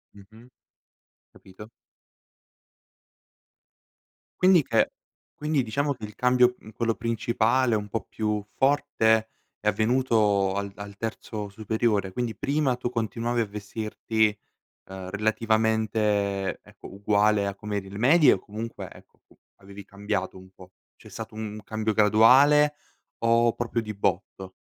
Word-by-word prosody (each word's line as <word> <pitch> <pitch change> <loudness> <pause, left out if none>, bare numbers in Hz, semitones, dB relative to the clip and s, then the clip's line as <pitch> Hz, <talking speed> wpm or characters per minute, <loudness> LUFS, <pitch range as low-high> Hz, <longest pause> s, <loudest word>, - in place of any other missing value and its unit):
Mh-mh. 110 +4 -16 0.9
Capito. 100 +3 -14 2.7
Quindi 185 -3 +5
che 115 -3 +1 0.5
quindi 150 -3 +1
diciamo 140 +5 -1
che 110 -4 -8
il 105 - -12
cambio, 125 0 +3
mhmm, 110 - -14
quello 115 +1 -1
principale, 115 +2 +1
un 105 -1 -3
po' 115 - -3
più 105 -1 -2
forte 110 -5 +2 0.3
è 105 - -5
avvenuto 110 -4 +2
al 100 0 -3
al 100 0 -9
terzo 110 -2 -5
superiore, 105 -1 -1
quindi 120 +1 -3
prima 140 -2 0
tu 120 0 -4
continuavi 115 +1 -2
a - - 0
vestirti, 110 +1 -1 0.6
ehm, 95 -1 -8
relativamente, 110 -2 0
ecco, - - -14
uguale 105 +1 +2
a 100 - -3
com'eri 100 -1 -5
le 100 - -8
medie 150 +6 +5
o - - +1
comunque, 110 +4 -7
ecco, - - -18 0.4
avevi 100 0 -12
cambiato 100 -1 -4
un 95 0 -15
po'? 95 0 -16 0.2
C'è - - -16
stato 110 -1 -8
un 110 -1 -6
cambio 110 0 -2
graduale 130 +8 +5 0.4
o 115 0 +3
proprio 120 0 -2
di 105 -1 -6
botto? 95 0 -3
110 Hz, 125 wpm, -26 LUFS, 100-115 Hz, 2.7 s, Quindi